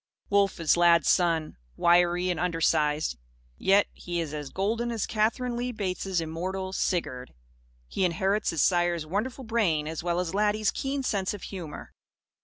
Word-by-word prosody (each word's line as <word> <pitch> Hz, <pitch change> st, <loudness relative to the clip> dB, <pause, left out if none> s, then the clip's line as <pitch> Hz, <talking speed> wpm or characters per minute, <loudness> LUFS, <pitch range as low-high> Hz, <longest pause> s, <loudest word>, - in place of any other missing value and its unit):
Wolf 200 Hz, -2 st, +2 dB
is 165 Hz, -2 st, +3 dB
Lad's 170 Hz, -2 st, +5 dB
son 165 Hz, -, +2 dB, 0.2 s
wiry 175 Hz, +1 st, +3 dB
and 175 Hz, -, -3 dB
undersized; 155 Hz, -, +1 dB, 0.4 s
yet 200 Hz, +1 st, +4 dB
he 175 Hz, -1 st, -4 dB
is 160 Hz, -3 st, -3 dB
as 150 Hz, -2 st, -5 dB
golden 225 Hz, -, -1 dB
as 225 Hz, -3 st, -1 dB
Katherine 235 Hz, +3 st, 0 dB
Lee 245 Hz, +1 st, -2 dB
Bates' 190 Hz, -4 st, -2 dB
immortal 185 Hz, +4 st, -4 dB
"Sigurd." 130 Hz, -, -2 dB, 0.5 s
He 190 Hz, -, -2 dB
inherits 190 Hz, +4 st, +1 dB
his 165 Hz, -, +1 dB
sire's 175 Hz, -3 st, +2 dB
wonderful 220 Hz, -, -3 dB
brain 200 Hz, -10 st, 0 dB
as 160 Hz, 0 st, -4 dB
well 175 Hz, +1 st, -1 dB
as 180 Hz, -1 st, -2 dB
Laddie's 210 Hz, +1 st, +1 dB
keen 270 Hz, 0 st, -3 dB
sense 200 Hz, -5 st, -1 dB
of 200 Hz, -, -11 dB
humour. 170 Hz, -6 st, -8 dB
180 Hz, 155 wpm, -27 LUFS, 165-205 Hz, 0.5 s, Lad's